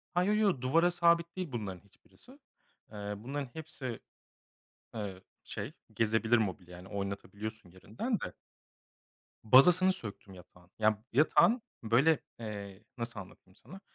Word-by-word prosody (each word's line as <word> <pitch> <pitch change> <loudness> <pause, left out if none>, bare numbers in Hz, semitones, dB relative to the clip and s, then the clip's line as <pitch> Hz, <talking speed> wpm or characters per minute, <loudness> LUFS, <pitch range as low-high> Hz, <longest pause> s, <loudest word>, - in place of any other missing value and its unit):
Ha, 180 - +4
yo, 205 +3 +2
yo, 210 -3 +4
duvara 165 +7 +3
sabit 170 -1 +3
değil 180 -6 -3
bunların 100 -6 -4
hiçbirisi. 245 - -20 0.5
Iıı, 105 0 -6
bunların 140 +1 -4
hepsi, 145 -6 -6 1.0
ııı, 100 -4 -5 0.2
şey, - - -6 0.2
gezebilir 115 +1 +2
mobilya. 90 -4 -3
Hani 90 - -12
oynatabiliyorsun 100 +1 -5
yerinden 110 - -3
de. - - -5 1.1
Bazasını 175 - +7
söktüm 100 - -9
yatağın. 90 0 -17
Ya 110 0 +2
yatağın, 190 - +5 0.2
böyle, 130 +8 +4 0.2
eee, 100 -3 -7
nasıl 115 -3 -4
anlatayım 95 0 -13
sana? 195 - -13
110 Hz, 125 wpm, -32 LUFS, 100-160 Hz, 1.1 s, Bazasını